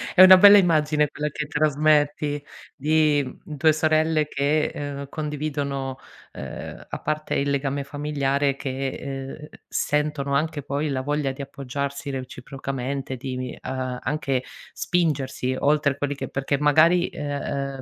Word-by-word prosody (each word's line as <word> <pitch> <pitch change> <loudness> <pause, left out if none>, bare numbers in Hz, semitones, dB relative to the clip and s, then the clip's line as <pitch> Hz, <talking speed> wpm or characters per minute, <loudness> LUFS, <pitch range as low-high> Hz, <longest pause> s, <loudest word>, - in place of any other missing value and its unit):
È 185 - +8
una 185 0 +11
bella 205 +2 +9
immagine 150 -4 +3
quella 150 +1 -3
che 150 +1 -5
trasmetti, 150 -1 +1 0.3
di, 150 0 +2
mhmm, 140 +3 -9
2 155 +2 +4
sorelle 155 0 +2
che, 145 +2 +1
ehm, 140 -1 -5
condividono, 145 -3 -3 0.4
ehm, - - -8
a - - -5
parte 155 0 -2
il 140 0 0
legame 140 0 -1
familiare, 140 -1 0
che, 135 -1 -3
ehm, 135 +3 -7 0.2
sentono 150 -1 -1
anche 150 0 0
poi 145 +2 -2
la 130 -1 -1
voglia 145 0 -1
di 135 +1 -8
appoggiarsi 140 +1 -5
reciprocamente, 135 +1 -5
di 130 0 -5
vi 125 -1 -4
ehm, 130 -1 -4
anche 135 -2 -1 0.3
spingersi 135 -6 -1
oltre 145 -1 +2
quelli 145 0 -2
che - - -5
perché 135 +1 -1
magari, 160 +5 +4
ehm, 140 -2 -4
145 Hz, 140 wpm, -24 LUFS, 135-150 Hz, 0.4 s, una